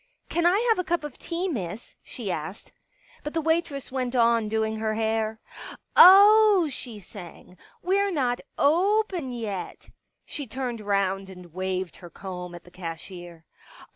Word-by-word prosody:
" - - -43
Can 340 0 +2
I 365 +3 +4
have 445 - +3
a - - +1
cup 345 -2 -1
of 295 -3 -8
tea. 345 +2 -3
Miss? 210 - -5
" - - -47
she 215 -7 -6
asked. 165 +5 -6 0.5
But 295 +2 -6
the 325 - +1
waitress 320 -4 -1
went 255 -1 -2
on 230 -2 +3
doing 220 0 -1
her 215 0 -1
hair. 220 0 -1 0.3
" - - -11 0.2
Oh," 405 -1 +8
she 240 -4 -6
sang, 180 -2 -12
" - - -31
we're 395 +2 +2
not 250 -7 0 0.2
open 360 -1 +2
yet." 215 -6 -6 0.3
She 285 -4 -6
turned 245 -2 -4
round 195 -1 -1
and 180 -3 -13
waved 185 0 -3
her 175 - -12
comb 180 0 -8
at 175 - -11
the 175 - -17
cashier. 170 -1 -9
230 Hz, 170 wpm, -26 LUFS, -, 0.5 s, Oh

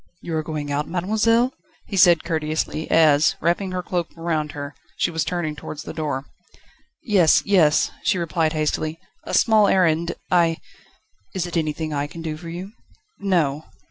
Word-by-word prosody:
"You 165 - -5
are 155 - +1
going 150 -2 -4
out, 145 +1 -1
mademoiselle?" 220 +7 +1 0.3
he 200 - -6
said 175 -4 +5
courteously, 155 -1 -2
as, 155 -2 +4
wrapping 175 +4 0
her 180 -1 -3
cloak 175 -3 -2
around 160 -3 -2
her, 145 0 -6 0.2
she - - +1
was 160 -1 -1
turning 170 -4 -2
towards 150 0 -8
the - - -7
door. 145 -4 -3 0.8
"Yes, 190 -8 +4
yes," 170 -7 +3
she 190 - +1
replied 165 -2 0
hastily; 155 +1 -1 0.3
"a - - -2
small 215 -3 +5
errand, 170 -3 +2 0.2
I 170 -2 +3 0.4
..." 100 -1 -37
"Is 185 -2 -1
it 175 - -6
anything 155 -1 -2
I 145 0 -1
can 165 +2 -9
do 155 -2 -3
for 165 +2 -9
you?" 180 +4 -7 0.5
"No." 160 -6 0
165 Hz, 170 wpm, -22 LUFS, 155-180 Hz, 0.8 s, said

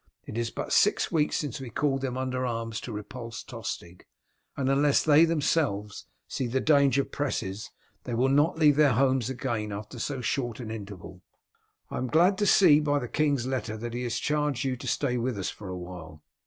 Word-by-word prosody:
It - - -8
is 115 0 -1
but - - -4
six - - +3
weeks 155 -2 +1
since 145 -2 -3
we 130 - -6
called 135 +3 0
them 130 -2 -3
under 130 -1 -2
arms 115 -2 -3
to 120 - -7
repulse 115 +2 -7
Tostig, 95 -7 -7 0.5
and 135 -2 -1
unless 140 +1 +3
they 155 +1 +6
themselves 140 -10 -1 0.2
see 130 - -3
the 130 +3 0
danger 140 -2 +3
presses 110 -8 -3 0.4
they 120 - -3
will 125 +3 +2
not 145 +5 +3
leave 150 -3 +5
their 145 -4 +5
homes 130 0 +2
again 120 -5 -3
after 105 +4 -7
so 135 +2 -3
short 120 -2 -2
an 115 -3 -6
interval. 100 -4 -8 0.7
I - - -3
am 130 - -2
glad 175 +8 +3
to 205 - +2
see 155 -8 +6
by 145 -1 +1
the 125 -4 -3
king's 145 -3 +1
letter 125 -4 -3
that 115 +1 -6
he 120 - -3
has 120 -2 -2
charged 150 -4 0
you 130 -2 -1
to 125 - -8
stay 125 - 0
with 120 -1 -2
us 95 - -2
for 100 - -10
a 90 - -4
while. 85 -4 -9
130 Hz, 200 wpm, -27 LUFS, 115-145 Hz, 0.7 s, they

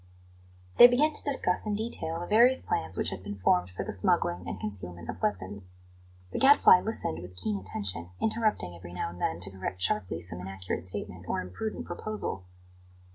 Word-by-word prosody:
They 240 - +13
began 290 +6 +2
to - - -4
discuss 265 -9 +1
in 210 - 0
detail 205 -7 -1
the 175 - -4
various 240 +7 +5
plans 90 +3 +2
which - - 0
had 90 - -6
been 100 +1 -7
formed 90 -1 +2
for 90 - -5
the - - -4
smuggling 85 0 +1
and 95 - -5
concealment 90 -4 -6
of 90 - -12
weapons. 95 -2 -3 0.6
The - - -3
Gadfly 270 -9 +7
listened 85 - -3
with 90 +1 -11
keen 100 +3 -2
attention, 90 -2 -4
interrupting 215 - 0
every 85 0 -11
now 90 - -3
and 90 - -12
then 80 - -1
to 95 +2 -4
correct 95 -1 -5
sharply 90 -2 0
some 85 +1 -5
inaccurate 95 -1 -5
statement 90 -2 -5
or - - -1
imprudent 90 - -5
proposal. 215 - -5
95 Hz, 185 wpm, -29 LUFS, -, 0.6 s, They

